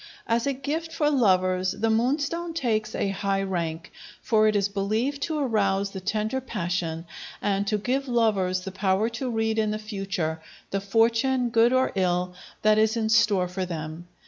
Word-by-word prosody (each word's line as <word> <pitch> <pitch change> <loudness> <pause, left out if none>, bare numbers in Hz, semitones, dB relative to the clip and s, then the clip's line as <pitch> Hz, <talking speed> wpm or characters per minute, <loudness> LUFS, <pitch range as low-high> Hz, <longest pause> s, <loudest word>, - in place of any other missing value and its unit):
As 230 +3 0
a 280 - +1
gift 305 +5 -3
for 300 -2 +1
lovers 185 -7 +2
the 225 +1 0
moonstone 290 +8 0
takes 220 -7 -1
a 200 - 0
high 195 0 -1
rank, 170 -3 -3 0.3
for 215 -1 +3
it 215 - +2
is 200 -1 +2
believed 215 +8 -1
to 315 -2 -1
arouse 200 -7 +1
the 190 - -7
tender 215 +6 -1
passion, 175 -7 -3 0.3
and 200 0 0
to 210 - +1
give 260 +6 -1
lovers 205 -7 +1
the 190 - -6
power 195 +3 +1
to 245 +3 -4
read 225 -1 0
in 215 -1 +1
the 210 - -1
future 195 -7 -3 0.3
the 195 - -1
fortune, 230 +5 +2
good 230 +1 +4
or 260 0 +2
ill, 180 -1 0 0.3
that 215 0 +5
is 220 +1 +2
in 220 -1 0
store 210 -5 +3
for 185 +1 -4
them. 160 0 -6
215 Hz, 175 wpm, -26 LUFS, 190-235 Hz, 0.3 s, that